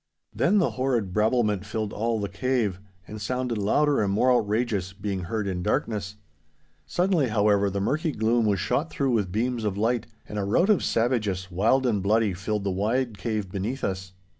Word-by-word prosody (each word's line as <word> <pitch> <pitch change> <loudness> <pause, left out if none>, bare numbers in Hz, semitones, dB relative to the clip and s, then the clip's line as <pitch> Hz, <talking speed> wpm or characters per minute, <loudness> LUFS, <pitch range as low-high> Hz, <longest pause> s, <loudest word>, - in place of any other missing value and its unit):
Then 210 - +2
the 185 - +2
horrid 120 -8 -1
brabblement 105 -2 +2
filled 105 0 -3
all 115 +1 -1
the 100 - -2
cave, 105 -2 -1 0.3
and 110 0 -8
sounded 125 +1 -2
louder 145 +8 +2
and 100 -2 +1
more 125 +6 +3
outrageous, 105 -5 0
being 100 -2 -4
heard 105 +3 -2
in 90 -2 -2
darkness. 100 +2 -1 0.7
Suddenly, 175 -6 +2
however, 105 -2 +2
the 100 +1 -2
murky 155 - 0
gloom 115 -1 +1
was 100 -2 +1
shot 150 - 0
through 135 -2 0
with 105 -6 0
beams 115 +3 -1
of 100 -2 -1
light, 115 +2 0 0.2
and 105 - -4
a - - -1
rout 170 - +3
of 205 - +2
savages, 105 -6 0
wild 115 +9 +2
and 110 -5 +1
bloody, 105 +1 +2
filled 100 +3 -3
the 100 - -1
wide 110 +3 -1
cave 105 -2 -3
beneath 105 +8 -3
us. 95 -1 -3
110 Hz, 185 wpm, -26 LUFS, 100-125 Hz, 0.7 s, more